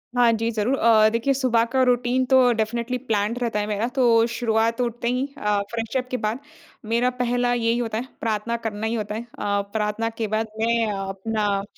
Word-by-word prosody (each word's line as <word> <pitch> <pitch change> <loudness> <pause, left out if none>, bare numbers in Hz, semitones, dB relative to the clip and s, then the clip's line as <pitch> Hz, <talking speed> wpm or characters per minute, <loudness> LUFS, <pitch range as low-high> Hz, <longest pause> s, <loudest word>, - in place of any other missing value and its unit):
हाँ 240 -1 +5
जी 225 +1 0
ज़रूर। 230 +4 0
अ, 220 -2 +5
देखिए 235 +4 +1
सुबह 255 -4 +2
का 260 -1 +2
रूटीन 250 +1 +2
तो 260 -1 +5
डेफिनिटली 235 +3 -2
प्लान्ड 215 +3 0
रहता 225 -3 0
है 210 - -2
मेरा 215 +2 -1
तो 230 -3 +4
शुरुआत 230 0 +1
उठते 235 -1 -2
ही 250 +2 0
अ, 210 -5 +1
फ्रेश 230 +3 -2
अप 255 0 -2
के 255 - 0
बाद 220 +2 -2 0.5
मेरा 245 +2 +3
पहला 245 0 +1
यही 235 0 +1
होता 225 -2 -2
है, 250 +3 -4
प्रार्थना 225 +1 -1
करना 215 0 -3
ही 225 - -1
होता 210 -1 -3
है। 225 - -3
अ, 205 -3 -2
प्रार्थना 220 +1 -1
के 225 -2 -1
बाद 215 +1 -1
मैं 230 0 +2
अपना 195 +1 -2
230 Hz, 200 wpm, -23 LUFS, 215-245 Hz, 0.5 s, हाँ